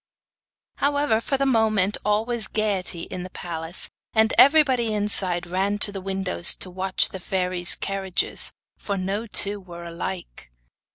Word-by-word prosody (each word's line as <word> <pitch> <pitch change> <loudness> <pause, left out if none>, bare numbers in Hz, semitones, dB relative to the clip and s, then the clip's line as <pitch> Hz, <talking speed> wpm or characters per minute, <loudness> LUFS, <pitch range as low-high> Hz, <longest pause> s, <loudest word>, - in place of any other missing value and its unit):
However, 285 -5 0
for 275 +4 -2
the 275 - 0
moment 215 -6 +1
all 210 +1 0
was 235 -4 -4
gaiety 195 -5 -2
in 185 - -7
the 185 - -8
palace, 165 -1 -2 0.3
and 220 0 +3
everybody 260 -6 +4
inside 190 -4 +3
ran 190 +3 -2
to 205 - +1
the 195 -1 -7
windows 190 -2 +2
to 185 - -4
watch 190 +1 0
the 190 - -8
fairies' 180 -1 0
carriages, 195 -2 0 0.3
for 200 -1 -4
no 195 +4 -3
two 205 -1 +3
were 175 -2 -11
alike. 170 - -7
195 Hz, 150 wpm, -23 LUFS, 185-220 Hz, 0.3 s, everybody